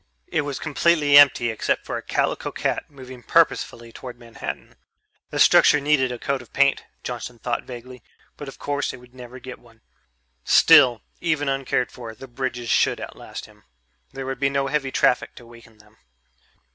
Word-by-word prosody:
It - - -1
was 145 -2 -4
completely 150 -1 +2
empty 140 -5 +6
except 110 - -2
for - - -4
a - - -4
calico - - -2
cat - - -2
moving 130 -3 -12
purposefully 115 +1 +1
toward 125 0 -10
Manhattan. 115 -1 -8 0.6
The - - -5
structure 150 - +6
needed 140 -3 +1
a 125 - -5
coat 140 +2 -2
of 120 - -17
paint, 140 0 +2 0.2
Johnson 120 0 -6
thought 120 0 -3
vaguely, 125 0 -10 0.3
but 145 - -9
of 135 - -10
course 145 0 -3
it - - -9
would 125 0 -18
never 125 0 -11
get 130 0 -10
one. 115 -2 -22 0.6
Still, 130 -8 +6 0.2
even 155 -4 -1
uncared 135 -2 -1
for, 115 -3 -9
the 135 - -11
bridges 120 -2 -4
should - - +2
outlast - - -9
him - - -20 0.5
there 135 0 -7
would 135 0 -5
be 140 -1 +2
no 140 0 -1
heavy 135 -1 -1
traffic 125 - +1
to 120 - -13
weaken 115 -1 -17
them. 105 +1 -23
130 Hz, 175 wpm, -23 LUFS, 120-140 Hz, 0.6 s, empty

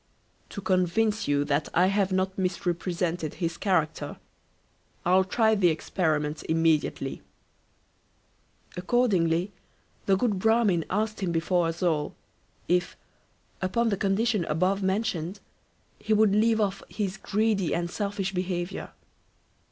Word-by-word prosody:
To 200 - -7
convince 190 +4 +1
you 145 0 +2
that 145 +1 0
I 180 - +5
have 195 0 +1
not 190 0 0
misrepresented 175 -3 -2
his 170 -2 -2
character, 165 -6 -1 0.9
I'll 185 +2 +5
try 220 +3 +2
the 200 -4 +3
experiment 155 -2 -1
immediately." 160 -1 +1 1.5
Accordingly, 185 -3 +1 0.6
the 195 -1 +4
good 205 -2 0
Bramin 220 -5 +3
asked 215 +2 -1
him 185 -3 0
before 170 +1 +1
us 165 +2 -4
all, 155 -4 0 0.5
if, 180 +1 0 0.6
upon 225 +5 +1
the 200 - +1
condition 200 +1 +1
above 185 +6 +1
mentioned, 190 -2 -1 0.6
he 220 - 0
would 215 -2 +4
leave 220 +1 +3
off 200 -2 0
his 195 -3 -3
greedy 205 -2 0
and 170 0 -1
selfish 200 -1 -2
behaviour. 180 0 -3
185 Hz, 120 wpm, -27 LUFS, 170-205 Hz, 1.5 s, I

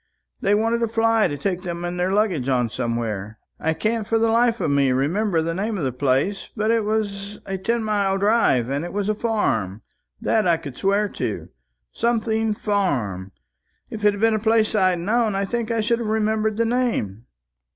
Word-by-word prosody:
They 205 - +3
wanted 225 +2 +1
a 230 - +2
fly 225 0 +2
to 145 -3 -4
take 180 +5 -2
them 175 -1 -5
and 175 0 -4
their 180 +1 +1
luggage 190 - +1
on 125 -3 +1
somewhere 110 -4 -3 0.2
I 160 0 0
can't 220 +3 -1
for 225 - +2
the 225 0 +2
life 235 0 +3
of - - 0
me 140 -2 +3
remember 165 +7 +1
the 165 +1 -2
name 205 +4 -2
of 170 - -3
the 130 - 0
place 140 +9 0
but 215 +1 +1
it 225 -2 +1
was 205 -1 -2
a 195 -1 -4
ten 230 +4 0
mile 200 -3 +1
drive, 200 - +3
and 140 +3 -2
it 175 - -6
was 205 0 -1
a - - +3
farm 115 - -1 0.4
that 220 -2 +1
I 170 -1 +4
could 145 -6 -9
swear 200 +5 +1
to - - -4 0.4
Something 225 -2 0
Farm. 125 - -1 0.6
If 215 -1 -6
it 205 -1 +4
had - - -8
been 225 0 +4
a 215 - +1
place 220 0 +2
I'd 185 -4 +3
known, 215 +4 +1
I 195 0 0
think 235 +2 -3
I 230 -1 +1
should 230 +2 +1
have 230 - -3
remembered 215 0 0
the 230 - +2
name." 225 - -1
205 Hz, 205 wpm, -22 LUFS, 160-220 Hz, 0.6 s, I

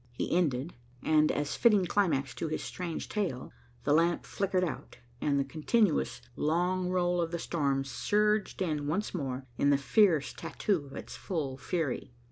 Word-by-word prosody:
He 125 - -1
ended, 155 -3 +1 0.3
and 155 -1 +4
as 145 0 -2
fitting 210 -6 +4
climax 150 -9 +1
to - - -3
his 155 - -3
strange 175 -3 -4
tale, 180 - -2 0.3
the 145 - +2
lamp 170 +2 +2
flickered 190 -2 0
out, 165 -6 -5 0.2
and 140 -1 +2
the - - +2
continuous 160 - +1
long 180 +4 +1
roll 175 -1 +1
of 165 - -1
the 170 - -2
storm 140 -5 0
surged 210 +8 +1
in 150 -4 -1
once 190 +8 -1
more 135 -6 -3
in 140 - +4
the 140 - +5
fierce 160 - +3
tattoo 175 -9 -2
of 135 - -11
its - - -7
full 155 -8 -3
fury. 140 -5 -3
165 Hz, 165 wpm, -30 LUFS, 140-185 Hz, 0.3 s, the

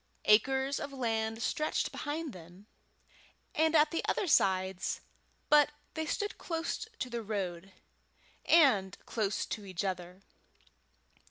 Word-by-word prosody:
Acres 265 +6 +3
of 285 - -5
land 225 -3 -1
stretched 305 - 0
behind 300 0 -4
them 180 +3 -13 0.9
and 320 +1 +2
at 305 0 +5
the 330 - -1
other - - +1
sides, 190 - +2 0.5
but 295 -1 +6 0.2
they 315 -1 -3
stood 410 +4 -2
close 330 +5 -3
to 255 - -3
the 235 -1 -4
road, 195 -4 -4 0.7
and 250 - +4
close 210 -3 -1
to 215 - -5
each 185 -2 -4
other. 180 0 -5
225 Hz, 120 wpm, -32 LUFS, 190-300 Hz, 0.9 s, but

